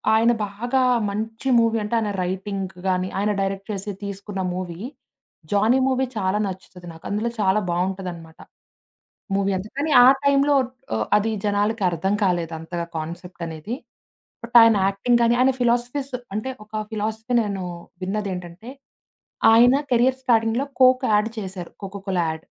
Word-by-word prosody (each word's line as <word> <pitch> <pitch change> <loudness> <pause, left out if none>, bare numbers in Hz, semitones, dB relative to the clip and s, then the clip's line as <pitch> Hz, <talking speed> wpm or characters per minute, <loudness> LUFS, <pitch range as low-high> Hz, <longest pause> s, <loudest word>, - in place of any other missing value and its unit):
ఆయన 230 +2 +4 0.2
బాగా 240 +6 -1 0.3
మంచి 220 +5 -4
మూవీ 230 0 +2
అంటే 210 +3 -2
ఆయన 215 -2 -1
రైటింగ్ 190 +1 -4
గాని, 185 0 +1
ఆయన 210 +1 +1
డైరెక్ట్ 195 +1 -3
చేసి 200 +1 -4
తీసుకున్న 200 0 -5
మూవీ 180 -2 -5 0.7
'జాని' 215 +6 +3
మూవీ 265 0 +1
చాలా 190 0 0
నచ్చుతది 185 -1 -9
నాకు. 160 - -15
అందులో 210 +3 -1
చాలా 195 +1 +3
బావుంటదనమాట. 175 -2 -4 1.0
మూవీ 200 0 +1
అంత. 185 +3 -6
కానీ 300 +2 0
ఆ - - +8 0.2
టైంలో 280 +1 +4 0.4
ఆహ్, 110 -1 -1
అది 215 +2 0
జనాలకి 205 +1 0
అర్థం 175 +4 -1
కాలేదంతగా 170 -2 -2
కాన్సెప్ట్ 170 +3 -7
అనేది. 160 +8 -5 0.7
బట్ 235 0 -9
ఆయన 225 -1 +6
యాక్టింగ్ 220 +5 +2
గాని, 235 +1 +4
ఆయన 260 +1 +5
ఫిలాసఫీస్ 245 +3 0 0.2
అంటే 215 +5 -2
ఒక 215 - -37 0.2
ఫిలాసఫీ 220 +3 -2
నేను 200 -3 -3 0.4
విన్నదేంటంటే, 190 +1 -4 0.8
ఆయన 245 +3 +6 0.2
కెరిర్ 250 +2 +3
స్టార్డింగ్‌లో 230 +1 +2
'కోక్' 255 0 +5
యాడ్ 210 +1 +3
చేశారు. 190 -3 -7
'కోకోకో'ల 195 -1 -3
యాడ్. 160 0 -6
205 Hz, 140 wpm, -23 LUFS, 185-235 Hz, 1.0 s, ఆ